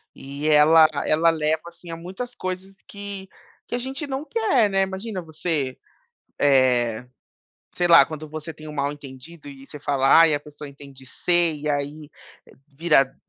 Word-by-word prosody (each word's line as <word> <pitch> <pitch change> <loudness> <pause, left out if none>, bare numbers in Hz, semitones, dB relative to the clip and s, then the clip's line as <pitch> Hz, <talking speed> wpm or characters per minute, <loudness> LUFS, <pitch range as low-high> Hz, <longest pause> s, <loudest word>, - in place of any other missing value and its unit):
E 140 +3 -6
ela 155 +1 +6 0.2
ela 165 +2 +3
leva, 160 0 0
assim, 170 0 -12
a - - -5
muitas 190 +9 -7
coisas 185 0 -6
que 200 -1 -8 0.4
que - - -3
a - - -1
gente 265 +4 -5
não 270 +2 -4
quer, 350 - +1
né. 195 0 +2
Imagina 190 +1 -4
você, 155 -4 -3 0.6
eh, 125 -4 +2 0.7
sei 175 - 0
lá, 165 -5 +8
quando 155 0 -8
você 155 +1 -7
tem 155 0 -13
um 150 - -8
mal 140 0 -1
entendido 145 +2 -12
e 135 -1 -12
você 150 +2 -11
fala: 140 -2 0
"Ai, 160 -2 +5
a 145 - -2
pessoa 150 -1 -11
entende 140 -1 -14
"C" 175 +3 +2
e 150 +1 -6
aí 145 +1 -4 0.6
vira 145 -2 +1
155 Hz, 165 wpm, -23 LUFS, 145-180 Hz, 0.7 s, lá